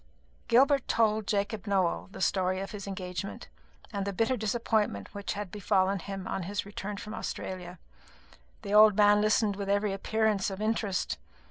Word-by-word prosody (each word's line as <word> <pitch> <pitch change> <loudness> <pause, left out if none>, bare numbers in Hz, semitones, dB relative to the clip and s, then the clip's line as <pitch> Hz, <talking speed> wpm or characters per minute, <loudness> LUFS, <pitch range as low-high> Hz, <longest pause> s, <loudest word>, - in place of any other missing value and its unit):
Gilbert 275 +3 +4
told 220 -2 +2
Jacob 205 0 -1
Nowell 190 -2 +1
the - - -9
story 185 -1 +1
of 195 - -5
his 200 -2 -7
engagement, 190 0 -5 0.4
and 200 -1 -1
the 200 - -2
bitter 225 +6 +1
disappointment 215 - -1
which 200 0 -4
had 205 -3 -5
befallen 195 -1 +1
him 195 +1 -6
on 195 - -2
his 200 +4 -3
return 205 0 -6
from 210 +2 -7
Australia. 180 -3 -5 0.9
The 200 -1 -4
old 210 -1 +8
man 205 0 +6
listened 215 -1 +2
with 200 0 -4
every 200 0 +1
appearance 215 0 0
of 195 0 -6
interest. 215 -3 -1
200 Hz, 160 wpm, -29 LUFS, 195-215 Hz, 0.9 s, old